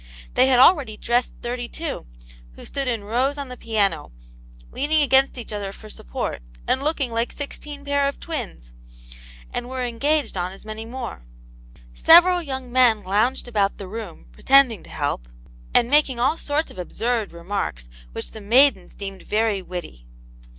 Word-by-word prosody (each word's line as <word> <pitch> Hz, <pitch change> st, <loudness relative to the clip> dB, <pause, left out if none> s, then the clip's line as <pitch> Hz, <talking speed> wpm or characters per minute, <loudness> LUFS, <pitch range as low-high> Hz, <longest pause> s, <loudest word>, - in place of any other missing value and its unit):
They 255 Hz, -, +4 dB
had 255 Hz, -2 st, +4 dB
already 260 Hz, -, +5 dB
dressed 240 Hz, +3 st, 0 dB
thirty 240 Hz, 0 st, -3 dB
two, 320 Hz, -, -4 dB, 0.5 s
who -, -, -12 dB
stood 275 Hz, -1 st, -3 dB
in 230 Hz, -4 st, -1 dB
rows 255 Hz, +7 st, 0 dB
on 280 Hz, -2 st, -5 dB
the 250 Hz, -, -7 dB
piano, 200 Hz, -, 0 dB, 0.6 s
leaning 300 Hz, +2 st, +2 dB
against 270 Hz, -1 st, +4 dB
each 235 Hz, -3 st, -7 dB
other 200 Hz, -2 st, -4 dB
for 215 Hz, +2 st, -12 dB
support, -, -, -4 dB, 0.3 s
and 260 Hz, -, +1 dB
looking 285 Hz, -4 st, -1 dB
like 230 Hz, +1 st, -1 dB
sixteen 285 Hz, 0 st, -8 dB
pair 285 Hz, 0 st, +2 dB
of 280 Hz, -, -4 dB
twins; 235 Hz, -, -6 dB, 0.8 s
and 245 Hz, -, -4 dB
were 260 Hz, -1 st, -3 dB
engaged 285 Hz, +5 st, 0 dB
on 180 Hz, 0 st, -2 dB
as 195 Hz, -, -14 dB
many 215 Hz, +1 st, -6 dB
more. 235 Hz, -, -7 dB, 0.7 s
Several 350 Hz, -, +7 dB
young 265 Hz, -5 st, -5 dB
men 240 Hz, -4 st, +4 dB
lounged 215 Hz, +8 st, +1 dB
about 205 Hz, -4 st, 0 dB
the 195 Hz, -, -7 dB
room, 210 Hz, -, -8 dB
pretending 255 Hz, -, +4 dB
to -, -, -15 dB
help, -, -, -3 dB, 0.4 s
and 235 Hz, -, +4 dB
making 275 Hz, -2 st, +3 dB
all 260 Hz, +6 st, +3 dB
sorts 300 Hz, +2 st, -1 dB
of -, -, -11 dB
absurd 225 Hz, +4 st, -2 dB
remarks, 170 Hz, -, -4 dB, 0.2 s
which -, -, -6 dB
the 220 Hz, -, -9 dB
maidens 230 Hz, -2 st, +3 dB
deemed 195 Hz, -2 st, -7 dB
very 215 Hz, -2 st, 0 dB
witty. 175 Hz, -, -8 dB
240 Hz, 165 wpm, -23 LUFS, 200-275 Hz, 0.8 s, Several